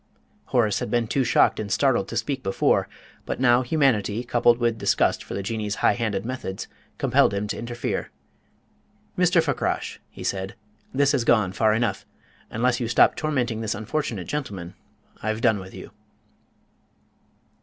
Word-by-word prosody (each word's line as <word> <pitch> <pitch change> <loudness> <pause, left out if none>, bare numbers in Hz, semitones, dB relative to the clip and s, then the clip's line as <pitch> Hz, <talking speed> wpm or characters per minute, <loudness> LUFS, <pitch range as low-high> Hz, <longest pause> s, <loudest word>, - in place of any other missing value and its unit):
Horace 110 -5 +1
had - - -4
been 120 +1 +1
too 135 +4 +1
shocked 120 - +3
and 105 -2 -4
startled 120 -3 +2
to - - -4
speak 140 -2 -2
before, 95 -5 +1 0.3
but - - -4
now 125 -1 +5
humanity, 120 -6 +1
coupled 120 -1 +3
with 120 -2 0
disgust - - +1
for - - -7
the 100 - -3
Jinnee's 105 0 -2
high - - +5
handed 110 -4 -2
methods, 120 -6 -5 0.3
compelled 100 - +3
him 100 +1 -1
to - - -3
interfere. 120 0 -3 1.1
"Mr. - - +3
Fakrash," - - -2
he - - -10
said, 95 0 -3 0.4
"this 140 +1 +3
has 135 -5 +1
gone 110 -6 +3
far 110 +2 +2
enough. 115 -3 -1 0.4
Unless 120 +2 +1
you 120 - -1
stop 115 - +4
tormenting 125 -7 -1
this 110 - -2
unfortunate 110 - -3
gentleman, 100 -12 -5 0.5
I've 110 0 -2
done 110 -3 +3
with 95 0 -10
you." - - -10
115 Hz, 155 wpm, -24 LUFS, 105-125 Hz, 1.1 s, now